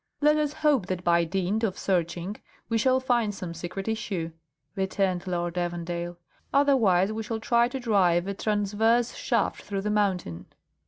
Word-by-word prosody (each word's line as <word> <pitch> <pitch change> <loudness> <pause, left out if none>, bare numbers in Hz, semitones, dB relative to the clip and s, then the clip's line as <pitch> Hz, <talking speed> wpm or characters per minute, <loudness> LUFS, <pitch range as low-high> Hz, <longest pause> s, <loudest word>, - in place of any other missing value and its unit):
"Let 300 +1 +4
us 300 -1 +1
hope 275 -11 +3
that 185 -1 -3
by 170 -1 +3
dint 190 +5 -1
of 195 -4 0
searching 180 +1 -1 0.3
we 225 -1 +1
shall 260 +3 +3
find 240 -5 +1
some 180 -3 -6
secret 175 +4 -6
issue," 195 -7 -2 0.4
returned 190 -1 -1
Lord 175 -1 -2
Evandale; 175 0 -3 0.3
"otherwise 220 -9 +3
we 220 - -3
shall 220 0 -3
try 235 +1 +3
to 265 +2 -5
drive 185 -7 +2
a 200 - -2
transverse 215 +3 +1
shaft - - -1
through 200 -1 -4
the 210 +1 -1
mountain." 190 - -1
195 Hz, 160 wpm, -27 LUFS, 175-225 Hz, 0.4 s, Let